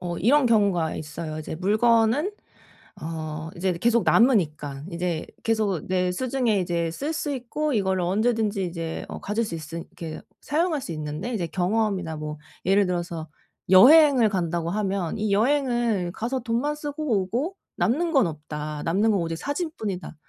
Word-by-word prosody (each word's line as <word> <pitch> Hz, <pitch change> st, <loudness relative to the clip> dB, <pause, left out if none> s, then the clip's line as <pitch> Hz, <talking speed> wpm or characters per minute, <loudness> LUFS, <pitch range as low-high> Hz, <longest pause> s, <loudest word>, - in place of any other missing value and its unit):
어 175 Hz, -1 st, -4 dB
이런 270 Hz, +8 st, +4 dB
경우가 200 Hz, -8 st, +2 dB
있어요. 155 Hz, 0 st, -6 dB
이제 155 Hz, -, -5 dB
물건은 225 Hz, -, +3 dB, 0.7 s
어 155 Hz, 0 st, -5 dB
이제 185 Hz, +1 st, 0 dB
계속 230 Hz, +6 st, +2 dB
남으니깐 150 Hz, -, +2 dB
이제 170 Hz, -2 st, -2 dB, 0.2 s
계속 215 Hz, -7 st, 0 dB
내 180 Hz, -1 st, +1 dB
수중에 245 Hz, -1 st, 0 dB
이제 170 Hz, -2 st, -1 dB
쓸 285 Hz, -, -3 dB
수 300 Hz, -2 st, -2 dB
있고 280 Hz, +4 st, -2 dB
이거를 190 Hz, -4 st, +1 dB
언제든지 210 Hz, +2 st, +1 dB
이제 165 Hz, -2 st, -4 dB
어 -, -, -6 dB
가질 210 Hz, +3 st, -1 dB
수 170 Hz, -, -5 dB
있으 160 Hz, 0 st, -7 dB
이렇게 170 Hz, -2 st, -8 dB, 0.2 s
사용할 320 Hz, +1 st, 0 dB
수 -, -, -6 dB
있는데 155 Hz, +9 st, -4 dB
이제 180 Hz, -7 st, -1 dB
경험이나 185 Hz, -2 st, 0 dB
뭐 150 Hz, 0 st, -5 dB, 0.3 s
예를 195 Hz, +2 st, +4 dB
들어서 170 Hz, -3 st, -3 dB, 0.4 s
여행을 260 Hz, -, +7 dB
간다고 170 Hz, -3 st, -1 dB
하면 195 Hz, -2 st, -1 dB
이 210 Hz, -1 st, -1 dB
여행을 240 Hz, -5 st, +1 dB
가서 245 Hz, +6 st, -2 dB
돈만 245 Hz, +5 st, -1 dB
쓰고 290 Hz, -7 st, -1 dB
오고 255 Hz, -, -2 dB, 0.2 s
'남는 325 Hz, +9 st, +1 dB
건 270 Hz, -7 st, +5 dB
없다. 150 Hz, -1 st, -6 dB
남는 200 Hz, +7 st, +2 dB
건 200 Hz, -, +2 dB
오직 165 Hz, -1 st, -2 dB
사진뿐이다.' 250 Hz, -, -4 dB
195 Hz, 320 characters per minute, -25 LUFS, 170-240 Hz, 0.7 s, 여행을